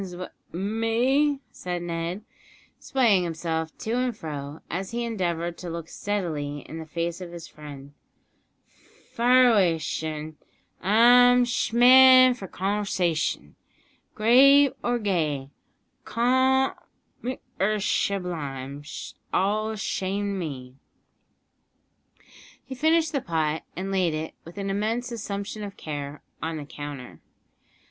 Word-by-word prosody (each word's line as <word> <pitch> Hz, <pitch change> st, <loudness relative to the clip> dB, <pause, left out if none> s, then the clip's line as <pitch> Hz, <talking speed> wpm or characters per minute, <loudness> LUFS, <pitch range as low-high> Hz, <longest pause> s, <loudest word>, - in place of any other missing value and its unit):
"Conv'shas'n 180 Hz, -1 st, -6 dB, 0.2 s
wi' -, -, -5 dB
me?" 240 Hz, +8 st, +1 dB
said 175 Hz, -1 st, -5 dB
Ned, 170 Hz, +3 st, -4 dB, 0.6 s
swaying 225 Hz, -9 st, +2 dB
himself 160 Hz, -1 st, -3 dB
to 220 Hz, -, -4 dB
and 250 Hz, -3 st, -1 dB
fro 145 Hz, -2 st, -6 dB
as 185 Hz, +3 st, -4 dB
he 235 Hz, +1 st, -3 dB
endeavoured 175 Hz, -6 st, -2 dB
to 180 Hz, -, -6 dB
look 165 Hz, -1 st, -6 dB
steadily 155 Hz, -8 st, -3 dB
in 160 Hz, -, -9 dB
the 160 Hz, -, -8 dB
face 170 Hz, +2 st, -3 dB
of 175 Hz, -2 st, -7 dB
his 170 Hz, -1 st, -9 dB
friend; 145 Hz, -2 st, -11 dB, 1.2 s
"fire 250 Hz, +1 st, +5 dB
away, 185 Hz, -7 st, +3 dB
shen. 155 Hz, 0 st, -4 dB, 0.4 s
I'm 245 Hz, +4 st, +6 dB
sh' 240 Hz, -1 st, -1 dB
man 255 Hz, +1 st, +8 dB
f'r 195 Hz, -7 st, -9 dB
conv'shash'n, 190 Hz, -4 st, -1 dB, 0.6 s
grave 270 Hz, +5 st, +6 dB
or 240 Hz, 0 st, +1 dB
gay, 155 Hz, -, -1 dB, 0.5 s
comic 260 Hz, +3 st, +2 dB, 0.8 s
'r 210 Hz, +2 st, +2 dB
shublime, 145 Hz, -9 st, -2 dB
's 150 Hz, -, -8 dB, 0.2 s
all 215 Hz, +3 st, +1 dB
the 220 Hz, -, -4 dB
shame 200 Hz, 0 st, -2 dB
to 195 Hz, -, -3 dB
me!" 130 Hz, -6 st, -6 dB, 1.9 s
He -, -, -7 dB
finished 315 Hz, +3 st, +2 dB
the 280 Hz, -, -1 dB
pot, 160 Hz, -3 st, -1 dB
and 190 Hz, +2 st, -4 dB
laid 180 Hz, -5 st, +1 dB
it, 155 Hz, +1 st, -5 dB
with 170 Hz, +3 st, -12 dB
an 195 Hz, -1 st, -2 dB
immense 225 Hz, +5 st, -1 dB
assumption 205 Hz, -2 st, -5 dB
of 200 Hz, -1 st, -8 dB
care, 145 Hz, -1 st, -6 dB, 0.2 s
on 160 Hz, 0 st, -3 dB
the 150 Hz, -, -6 dB
counter. 140 Hz, -, -8 dB
190 Hz, 125 wpm, -25 LUFS, 160-235 Hz, 1.9 s, man